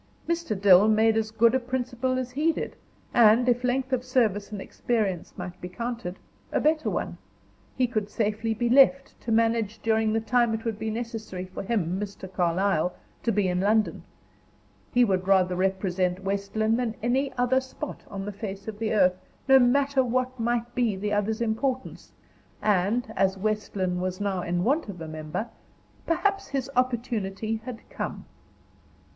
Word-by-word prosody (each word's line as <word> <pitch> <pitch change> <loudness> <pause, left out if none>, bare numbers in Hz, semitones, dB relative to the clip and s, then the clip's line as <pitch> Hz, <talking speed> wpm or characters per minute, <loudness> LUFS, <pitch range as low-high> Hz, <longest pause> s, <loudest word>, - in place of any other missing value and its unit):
Mr. 335 - -1
Dill 195 0 +7
made 220 +1 +4
as 220 -1 0
good 225 +2 +4
a 260 - +3
principal 255 0 -2
as 255 -1 -3
he 300 +6 +2
did, - - -5 0.4
and 235 +1 +6
if 245 0 +2
length 260 +1 0
of 250 -1 +1
service 220 -6 +1
and 205 - -5
experience 200 -4 -2
might 180 0 -7
be 180 - -6
counted 230 -3 -5 0.3
a - - +1
better 310 +1 +2
one. - - -3 0.6
He 255 - +3
could 215 -4 -2
safely 220 +1 -1
be 240 +2 0
left 275 +2 +5
to 230 - -4
manage 225 -1 +2
during 220 -1 +2
the 225 - +2
time 235 0 +2
it 225 - -7
would 220 -2 -2
be 220 +1 -2
necessary 220 -5 -5
for 185 - -7
him, 190 -4 -1
Mr. 200 -2 -6
Carlyle, 180 -1 +1 0.3
to 230 - +1
be 205 -2 +1
in 180 0 0
London. 215 +3 +2 0.9
He 245 0 +5
would 190 -3 0
rather 185 -2 +4
represent 185 -1 0
West 200 +1 -3
Lynne 220 +1 +2
than 240 -3 -1
any 265 +3 +1
other 250 +1 +3
spot 265 +3 -7
on 195 -1 -5
the 205 - -4
face 200 -1 -7
of 215 -1 -6
the 225 -1 -1
earth, 185 -3 +3 0.3
no 270 0 +8
matter 270 +2 +3
what 255 +1 -1
might 235 +1 -1
be 235 -5 +1
the 205 +2 -2
other's 215 +2 0
importance; 250 +3 -2 0.5
and, 215 +3 +1
as 190 0 +2
West 215 +2 -2
Lynne 180 -2 -1
was 185 0 -3
now 200 -3 -1
in 175 0 -1
want 275 - +1
of 185 -3 -7
a 160 - -6
member, 155 +8 -4 0.6
perhaps 395 +4 +1
his 275 -1 -3
opportunity 225 -4 -1
had 240 -3 -8
come. - - -5
220 Hz, 175 wpm, -26 LUFS, 195-245 Hz, 0.9 s, no